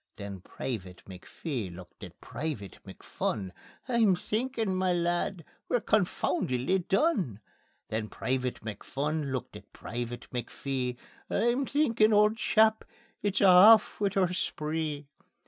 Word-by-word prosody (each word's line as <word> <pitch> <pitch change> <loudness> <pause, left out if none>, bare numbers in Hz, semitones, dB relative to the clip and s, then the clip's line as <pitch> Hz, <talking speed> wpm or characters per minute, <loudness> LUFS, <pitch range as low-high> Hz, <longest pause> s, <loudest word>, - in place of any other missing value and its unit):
Then 100 -1 -7
Private 95 -5 -6
McPhee 100 - -5
looked 90 0 -13
at - - -11
Private 140 -10 -5
McPhun: 95 -4 -4 0.4
"I'm 230 -6 +4
thinkin', 220 +1 -2
ma 185 0 +1
lad, 175 0 0 0.2
we're 245 - +2
confoundedly 180 - +1
done." 190 - +1 0.5
Then 110 0 -3
Private 130 -1 -2
McPhun 140 +7 -3
looked 130 -2 -4
at - - -12
Private 120 +1 -5
McPhee: 125 0 -3 0.3
"I'm 240 +3 +1
thinkin' 230 -7 +3
auld 210 +1 +4
chap, 220 -1 +3 0.4
it's 200 -2 0
a' - - +6 0.3
aff 210 - -6
wi' 200 - +3
oor 180 -2 +2
spree." 155 -3 -3
160 Hz, 120 wpm, -29 LUFS, -, 0.5 s, a